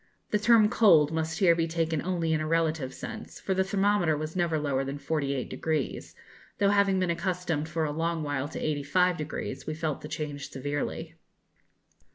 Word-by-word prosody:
The 210 - +2
term 220 -1 +6
'cold' 165 -10 +5
must 160 0 -2
here 180 -4 +5
be 165 0 0
taken 165 -2 -1
only 170 -3 0
in 155 - +1
a 155 - -2
relative 160 -4 0
sense, - - -8
for 190 - -1
the 190 0 +2
thermometer 195 -4 +2
was 155 +2 -5
never 170 -3 +1
lower 140 -3 0
than 135 +1 -4
48°, 140 0 -2 0.4
though, 200 -1 +3
having 200 -1 +3
been 185 -2 +1
accustomed 175 -3 -2
for 160 0 -1
a 150 - -2
long 165 +1 -1
while 145 -1 -2
to 160 - -6
85°, 155 +2 -1
we 155 - -2
felt 155 -2 -2
the - - -7
change 145 -2 -5
severely. 145 +2 -4
160 Hz, 175 wpm, -28 LUFS, 150-180 Hz, 0.4 s, term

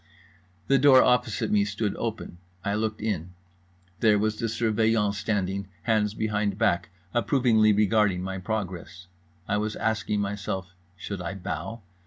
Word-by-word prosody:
The 135 -1 +3
door 130 -1 +7
opposite 125 -3 +1
me 105 -1 +4
stood 105 0 -2
open. 110 -6 -5 0.3
I 100 - 0
looked 110 0 -2
in. 90 -5 -3 0.6
There 110 -2 +4
was 110 +1 0
the 115 - 0
Surveillant 110 -2 +1
standing, 100 -1 -2 0.2
hands 105 -2 +1
behind 105 -2 -1
back, 85 - +1 0.2
approvingly 115 -2 +3
regarding 105 -3 +2
my 95 0 -4
progress. 90 -3 -5 0.4
I 105 - +1
was 105 0 -2
asking 105 -2 -1
myself, 95 -2 -3 0.2
Should 95 0 -5
I 95 +3 -4
bow? 95 +4 -5
105 Hz, 140 wpm, -26 LUFS, 95-110 Hz, 0.6 s, door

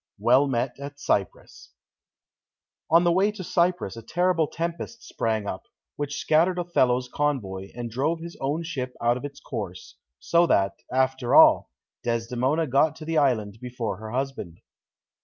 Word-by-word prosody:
Well 130 +4 +4
met 125 0 -2
at 140 0 -8
Cyprus 100 -2 -3 1.2
On 165 +2 +6
the 175 - +3
way 195 +4 +3
to 200 -3 -7
Cyprus 175 - 0
a 115 - -8
terrible 175 +5 +1
tempest 170 +9 -5
sprang 110 -2 -2
up, 95 - -6 0.3
which 145 -1 -4
scattered 170 +4 +2
Othello's 130 -8 +1
convoy, 110 -10 -2
and 120 -1 -5
drove 145 +8 0
his 170 +1 -8
own 145 +5 -1
ship 130 -6 -4
out 120 +1 +2
of 125 - -6
its 140 -1 -8
course, - - -7 0.2
so 170 - +3
that, 100 -7 +2 0.2
after 130 -1 +1
all, - - +7 0.3
Desdemona 125 +6 0
got 145 +3 +2
to 155 - -10
the 160 -1 +1
island 110 -7 0
before 120 -5 -4
her 110 +1 -8
husband. 130 -9 -4
135 Hz, 155 wpm, -25 LUFS, 120-165 Hz, 1.2 s, all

